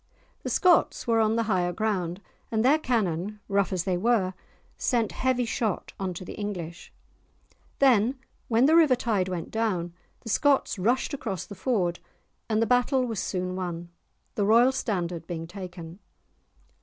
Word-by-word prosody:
The - - -4
Scots 360 -2 +3
were 230 -1 +2
on 220 0 +3
the 230 - +1
higher 185 -5 +1
ground, 190 -3 -2 0.3
and 220 +1 +1
their 295 +4 +5
cannon, 210 - -1
rough 200 -2 +1
as 185 -3 -1
they 185 -2 0
were, 195 -2 +1 0.4
sent 235 -4 0
heavy 255 -1 0
shot 220 -3 -2
on 185 -2 -3
to 185 - -7
the - - -7
English. 180 -5 -6 0.9
Then 255 -1 +4 0.3
when 235 +2 +3
the 315 +3 +5
river 310 -6 +6
tide 210 -6 0
went 175 -3 -4
down, 185 -7 -1 0.3
the 225 - -8
Scots 275 -3 +2
rushed 245 +9 +1
across 195 - -4
the 190 - -9
ford, 190 -6 0 0.5
and 220 0 +2
the - - +2
battle 250 +2 +2
was 225 -5 -3
soon 185 -1 -2
won, 175 -2 -4 0.4
the 205 - 0
royal 230 +5 +5
standard 175 -10 -3
being 165 -2 -4
taken. 175 -1 -9
210 Hz, 160 wpm, -27 LUFS, 180-240 Hz, 0.9 s, river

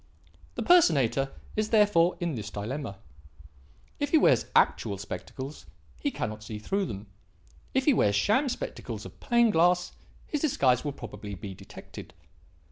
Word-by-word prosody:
"The - - -2
personator 140 - +4 0.2
is 215 0 0
therefore 205 -6 +4
in 170 -2 -1
this 110 -5 -5
dilemma: 110 +1 -5 1.0
if - - -1
he - - +5
wears - - +4
actual 100 - +3
spectacles, 130 +9 -7 0.3
he 290 - 0
cannot 110 - -4
see 105 0 -7
through 195 - -1
them; 100 +1 -6 0.7
if 265 0 +2
he 295 - +5
wears 100 - +3
sham 240 - +2
spectacles - - -5
of - - -12
plain 235 -3 +3
glass, 180 0 +3 0.3
his 300 - -3
disguise 130 - +2
will 145 - -2
probably 105 -5 -8
be 100 +1 -7
detected. - - -11
145 Hz, 145 wpm, -28 LUFS, -, 1.0 s, he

